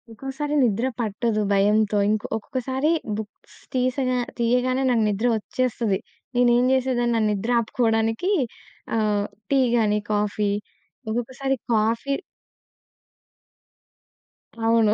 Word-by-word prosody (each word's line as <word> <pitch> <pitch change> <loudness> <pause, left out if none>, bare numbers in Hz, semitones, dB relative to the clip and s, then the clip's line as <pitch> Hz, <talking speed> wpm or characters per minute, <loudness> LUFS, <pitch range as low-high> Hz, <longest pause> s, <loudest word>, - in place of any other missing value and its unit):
ఒకోసారి 270 +5 -4
నిద్ర 230 0 +1
పట్టదు 220 0 0
భయంతో. 210 +1 +3
ఇంకో 215 0 0
ఒక్కొక్కసారి 265 +5 -1 0.3
బుక్స్ 215 -2 -10 0.2
తీసేగా 255 0 +1 0.2
తీయగానే 250 +2 +1
నాకు 235 -3 +3
నిద్ర 210 +4 0
ఒచ్చేస్తది. 225 -3 -1 0.4
నేనేం 245 0 +4
జేసేదాన్ని 250 -2 +1
నా 225 - +2
నిద్రాపుకోవడానికి 225 - +1 0.6
ఆహ్, 210 -2 +1 0.2
టీ 275 - +3 0.2
గాని 210 -2 +2
కాఫీ 210 0 0 0.6
ఒక్కొక్కసారి 255 +4 -1 0.2
కాఫీ 230 +5 +1 2.5
అవును. 225 -2 +4
230 Hz, 90 wpm, -24 LUFS, 215-255 Hz, 2.5 s, నేనేం